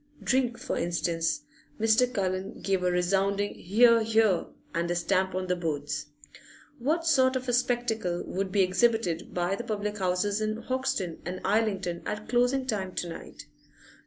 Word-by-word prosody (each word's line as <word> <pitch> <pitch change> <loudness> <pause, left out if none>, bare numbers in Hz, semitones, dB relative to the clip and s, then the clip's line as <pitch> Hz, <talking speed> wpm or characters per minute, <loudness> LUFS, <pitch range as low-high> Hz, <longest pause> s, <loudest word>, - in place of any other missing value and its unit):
Drink, 255 -2 +1
for 250 - -3
instance 170 - 0 0.4
(Mr. 225 +3 +4
Cullen 190 -4 -2
gave 195 -2 0
a 180 - +2
resounding 195 +3 +1
'Hear, 230 +5 +4
hear!' 220 -4 +3 0.3
and 170 +1 -1
a 175 - 0
stamp 190 +1 +1
on 185 0 -1
the 180 0 0
boards). 150 -4 -3 0.7
What 315 +7 0
sort 260 -5 +4
of 260 0 -3
a 245 - 0
spectacle 240 -7 0
would 190 0 -3
be 195 0 +4
exhibited 185 -3 +1
by 175 +1 0
the 235 - -5
public 210 -2 -3
houses 190 +3 0
in 215 0 -1
Hoxton 235 -9 -2
and 180 +2 -4
Islington 195 -5 0
at 210 +1 -4
closing 245 +2 +2
time 195 -7 -3
to 175 - -3
night? 165 - -9
200 Hz, 160 wpm, -28 LUFS, 180-235 Hz, 0.7 s, Mr